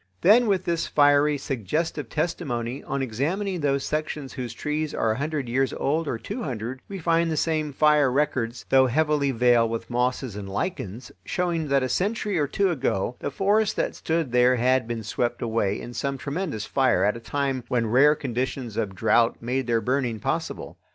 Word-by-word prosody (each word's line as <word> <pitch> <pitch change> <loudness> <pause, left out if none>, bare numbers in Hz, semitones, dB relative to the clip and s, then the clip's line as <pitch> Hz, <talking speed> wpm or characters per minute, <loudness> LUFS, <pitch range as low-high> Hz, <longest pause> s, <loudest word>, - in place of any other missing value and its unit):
Then, 225 +6 +6
with 190 -3 +1
this 170 -1 -1
fiery, 145 0 +4
suggestive 135 - -3
testimony, 130 -7 -2
on 135 0 -2
examining 170 - -2
those 140 -2 0
sections 150 -2 -3
whose 125 -4 -5
trees 150 +5 -3
are 110 - +1
a 110 - -2
hundred 145 -1 -2
years 130 +3 0
old 155 +3 -1
or 115 - -1
two 240 - -6
hundred, 125 - -4
we 200 - -5
find 165 -1 +1
the 160 - -1
same 155 -1 0
fire 150 -1 +4
records, 130 -4 -1
though 130 -1 +5
heavily 150 +1 +1
veiled 120 -2 +3
with 115 +1 -5
mosses 125 -1 -1
and 100 -1 -6
lichens, 110 - -4
showing 170 - -1
that 140 -1 +2
a - - 0
century 200 - -1
or 145 - +1
two 195 +6 +1
ago 125 - -1
the - - -3
forests 205 +7 +1
that - - -1
stood 160 -5 -2
there 125 +1 +4
had 125 0 +2
been 115 -1 -4
swept 120 +3 -2
away 110 -4 0
in 120 - -8
some 140 +2 -2
tremendous 145 - -3
fire 135 -1 +2
at 105 +2 +2
a - - -6
time 135 +1 -2
when 120 -2 0
rare 135 +7 +5
conditions 130 -4 -3
of 105 -4 -2
drouth 115 +5 +3
made 125 +2 -2
their 115 -1 +2
burning 125 -3 -1
possible. - - -3
135 Hz, 185 wpm, -25 LUFS, 120-155 Hz, -, Then